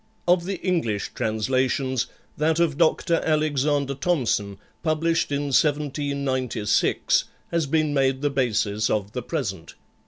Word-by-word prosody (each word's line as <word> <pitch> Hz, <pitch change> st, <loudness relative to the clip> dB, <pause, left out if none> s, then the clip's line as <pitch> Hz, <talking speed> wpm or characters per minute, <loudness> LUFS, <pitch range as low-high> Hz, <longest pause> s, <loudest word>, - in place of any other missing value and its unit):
Of 175 Hz, 0 st, +3 dB
the 195 Hz, +1 st, -2 dB
English 160 Hz, -, -1 dB
translations, 130 Hz, +3 st, 0 dB, 0.3 s
that 160 Hz, +2 st, +1 dB
of 165 Hz, -4 st, +2 dB
Dr. 165 Hz, +1 st, +2 dB
Alexander 145 Hz, -2 st, +1 dB
Thomson, 125 Hz, -, 0 dB, 0.2 s
published 165 Hz, 0 st, +1 dB
in 140 Hz, 0 st, -1 dB
1796, 140 Hz, -6 st, +1 dB, 0.3 s
has 170 Hz, -3 st, 0 dB
been 155 Hz, 0 st, +1 dB
made 135 Hz, -1 st, +1 dB
the 145 Hz, -, +2 dB
basis 110 Hz, -5 st, 0 dB
of 105 Hz, -1 st, -1 dB
the 125 Hz, -, -4 dB
present. 110 Hz, -, -4 dB
140 Hz, 120 wpm, -24 LUFS, 125-155 Hz, 0.3 s, Of